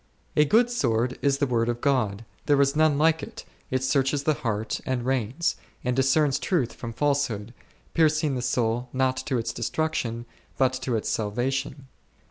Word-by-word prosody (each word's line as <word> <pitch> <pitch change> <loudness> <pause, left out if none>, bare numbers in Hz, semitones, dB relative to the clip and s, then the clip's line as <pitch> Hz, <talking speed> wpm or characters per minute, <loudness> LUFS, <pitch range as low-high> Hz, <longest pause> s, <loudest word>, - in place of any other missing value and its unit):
A 150 - +5
good 235 +9 +3
sword 120 - 0
is 140 -1 +2
the 140 - +1
word 120 -3 0
of 120 0 -2
God, 115 -6 0 0.2
there 145 -1 +4
is 140 +1 +3
none 155 -2 +3
like 160 +1 +3
it; - - -9 0.2
it 130 0 -1
searches 135 +1 +1
the 155 - +3
heart 110 -5 -3
and 125 -2 -2
reins, 130 +4 0 0.3
and 125 -1 0
discerns 135 +2 +3
truth 140 -11 0
from 115 - -7
falsehood, 120 -5 -1 0.4
piercing 155 -2 +2
the 125 - -2
soul 120 0 0
not 130 0 +1
to 135 -2 -1
its 115 0 -2
destruction 120 -2 -2 0.3
but 130 -1 +3
to 125 -3 -1
its 110 - -2
salvation. 130 +6 -2
130 Hz, 170 wpm, -26 LUFS, 120-145 Hz, 0.4 s, A